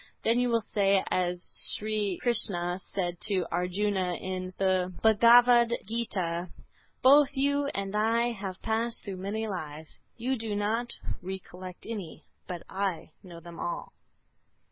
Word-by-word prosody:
Then 230 +2 +3
you 245 0 +2
will 230 -1 +2
say 195 -2 +3
as 180 -1 0
Sri 210 -3 0
Krishna 185 -7 0 0.2
said 175 -3 -1
to 190 -4 +1
Arjuna, 180 +1 0
in 185 0 -4
the 185 -1 +1
"Bhagavad 235 +2 +6
Gita:" 185 -6 -2 0.5
"Both 280 +1 +6
you 285 +1 +2
and 195 +1 -3
I 230 +3 +2
have 195 -4 -6
passed 225 +1 -1
through 195 -3 -6
many 210 +4 -3
lives; 155 -5 -7 0.2
you 255 +3 -1
do 220 -2 -3
not 225 +4 -1 0.3
recollect 185 -1 -8
any, 205 -8 -6 0.2
but 175 -2 -5
I 190 -4 -3
know 175 -3 -11
them 170 0 -11
all." 175 - -4
200 Hz, 135 wpm, -29 LUFS, 180-230 Hz, 0.5 s, Bhagavad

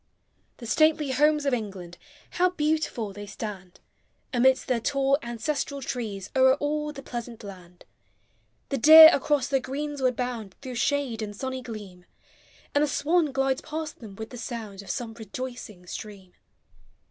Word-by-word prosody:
The 240 - -10
stately 310 +2 +3
Homes 295 +2 +3
of 275 - +1
England, 190 -7 -5 0.3
How 365 +1 +2
beautiful 305 - -1
they 205 +1 -8
stand! 195 -4 -7 0.5
Amidst 260 +1 +3
their 250 -3 +1
tall 275 +3 +1
ancestral 275 +4 -3
trees. 215 -7 -5
O'er 260 0 +6
all 300 +1 -2
the 275 -2 -10
pleasant 235 -1 -7
land; 180 -3 -12 0.8
The 275 - -1
deer 315 +4 +11
across 280 -1 +1
their 270 - +1
greensward 270 -1 -2
bound 235 -6 -4
Through 260 -2 -6
shade 250 -2 0
and 205 -1 -5
sunny 260 +3 -4
gleam. 205 -7 -9 0.7
And 290 - +3
the - - +2
swan 315 +1 +1
glides 270 +1 0
past 310 -1 -6
them 215 -5 -10
with 220 +2 -8
the 245 - -8
sound 220 -5 -6
Of 200 - -13
some 235 -3 -4
rejoicing 225 -3 -8
stream. 190 -1 -9
250 Hz, 150 wpm, -26 LUFS, 215-285 Hz, 0.8 s, deer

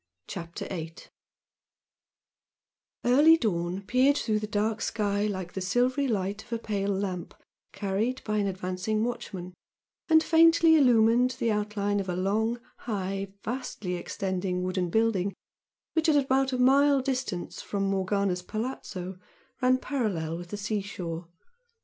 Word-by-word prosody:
CHAPTER 170 -2 -6
VIII 165 -3 -5 2.1
Early 295 +7 +7
dawn 185 - -1
peered 260 +7 +3
through 215 -5 0
the 215 - -4
dark 215 +1 -1
sky 205 -1 0
like 185 -4 -4
the 190 - -4
silvery 250 +9 +1
light 205 -2 -2
of 240 - -22
a 230 - 0
pale 205 -3 -2
lamp 190 -3 -3 0.4
carried 205 +6 -2
by 215 -1 -1
an 205 -1 +1
advancing 185 +3 -2
watchman, 190 -7 -5 0.6
and 320 0 +6
faintly 330 0 +6
illumined 245 -2 +4
the 230 - +1
outline 205 -1 0
of 195 -1 -3
a 180 - -1
long, 220 +6 0 0.2
high, 195 -3 -3 0.2
vastly 230 -6 -4
extending 180 0 -2
wooden 185 -1 -1
building 200 -2 +1 0.6
which, 320 0 +2
at 305 - +4
about 270 -1 +2
a 255 - -1
mile 275 +2 +5
distant 255 -9 -3
from 200 -1 -3
Morgana's 195 -1 0
"palazzo" 190 -4 -5 0.4
ran 255 0 +4
parallel 210 - -2
with 175 +1 -7
the 205 - -5
sea 210 0 -1
shore. 170 -4 -6
210 Hz, 135 wpm, -28 LUFS, 185-250 Hz, 2.1 s, Early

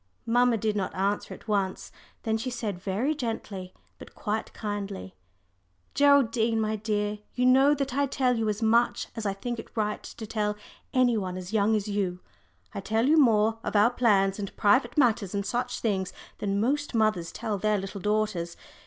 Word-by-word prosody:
Mamma 245 0 +3
did 215 0 -1
not 195 -2 -2
answer 200 +2 -1
at - - -10
once. 200 -3 -1 0.3
Then 220 -2 0
she 225 +3 -2
said 220 -7 -4
very 205 +11 0
gently, 220 -8 -5 0.3
but - - -13
quite 215 +1 -3
kindly, 200 - -5 0.8
"Geraldine, 240 -6 +4
my 215 0 0
dear, 210 -1 -2 0.2
you 250 - +1
know 270 +3 +6
that 275 -3 -2
I 280 +1 +1
tell 255 -2 +1
you 225 -2 0
as 210 +2 -2
much 235 +2 +2
as 225 -2 -3
I 195 - 0
think 235 +4 -4
it 225 - -11
right 210 -1 -1
to 220 - -8
tell 210 -1 -1 0.4
any 250 -3 +3
one 185 -3 -3
as 185 +3 -7
young 215 0 +3
as 210 0 -1
you 195 -3 -1 0.5
I - - -4
tell 220 +4 0
you 310 +4 +4
more, 225 -4 +4
of - - -4
our 210 +4 +5
plans 200 -5 +2
and 200 -1 -6
private 240 +5 +3
matters 225 -7 +2
and 200 0 -1
such 245 +3 -2
things, 195 -4 -1 0.3
than 200 -1 -1
most 280 +4 0
mothers 215 -6 +1
tell 210 -3 -3
their 215 +1 +2
little 195 0 -6
daughters. 210 -5 -1
215 Hz, 185 wpm, -27 LUFS, 200-240 Hz, 0.8 s, know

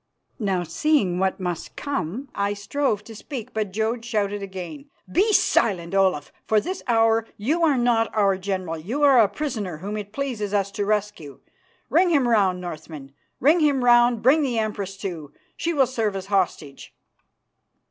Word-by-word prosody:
Now, 195 -5 0
seeing 185 - +1
what 190 0 0
must 180 -3 -4
come, 270 - -4
I 200 0 -1
strove 210 0 -1
to 225 - -11
speak, 240 +1 -8
but 215 -3 -2
Jodd 225 +3 -1
shouted 205 -3 -1
again, 195 - -8 0.2
"Be 410 +5 +3
silent, 185 - +2
Olaf. 190 -7 +1 0.2
For 220 - +4
this 370 - -5
hour 225 -1 +3
you 300 +11 0
are 300 -5 +3
not 235 -2 +2
our 200 -2 +3
general; 185 -4 -3
you 235 - -3
are 275 -3 +6
a 220 - +6
prisoner 210 - -4
whom 200 +6 -5
it 205 -1 -7
pleases 220 -6 -3
us 200 -1 0
to 200 0 -2
rescue. 210 -9 -2 0.5
Ring 360 +2 +3
him 285 -7 +3
round, 195 -6 +2
Northmen, 155 -5 -8 0.3
ring 310 +7 +4
him 285 -5 +2
round. 240 -1 +4
Bring 280 +6 +5
the 255 -5 -1
Empress, 205 -3 -3
too; 165 -7 -6 0.2
she 335 - -2
will 280 -5 +3
serve 225 -5 -2
as 190 -1 -4
hostage." 180 -8 -2
210 Hz, 170 wpm, -23 LUFS, 190-255 Hz, 0.5 s, are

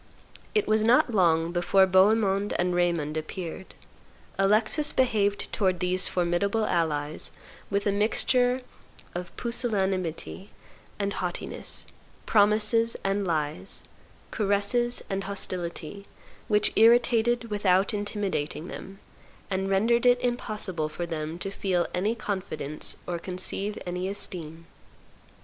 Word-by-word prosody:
It 425 - +3
was 215 0 +3
not 240 +1 +4
long 165 -4 +3
before 185 +2 +4
Bohemond 200 +1 +3
and 180 0 +1
Raymond 170 -4 0
appeared. 170 +3 -6 0.6
Alexis 220 +9 +3
behaved 210 -6 +1
towards 185 -3 +1
these 180 +1 +1
formidable 185 +5 0
allies 155 -4 -1 0.4
with 200 0 0
a 205 - +3
mixture 245 +5 +2 0.5
of 175 0 -5
pusillanimity 195 -6 -2 0.5
and 200 -1 -1
haughtiness, 180 -2 -4 0.4
promises 215 +2 +3
and 195 0 0
lies, 150 - -2 0.5
caresses 215 +4 +1
and 195 0 -3
hostility, 185 -1 -4 0.4
which 210 -1 +3
irritated 235 0 +4
without 200 0 +2
intimidating 200 -6 -3
them, 195 +1 -8 0.5
and 190 0 -1
rendered 230 +5 +3
it 245 0 +5
impossible 210 -9 -2
for 175 +3 -4
them 160 -1 -4
to 195 +2 -4
feel 185 -3 0
any 205 +6 0
confidence 190 -8 -3
or 175 -1 -3
conceive 190 +3 -3
any 180 +1 -3
esteem. 165 -5 -3
195 Hz, 110 wpm, -27 LUFS, 175-215 Hz, 0.6 s, it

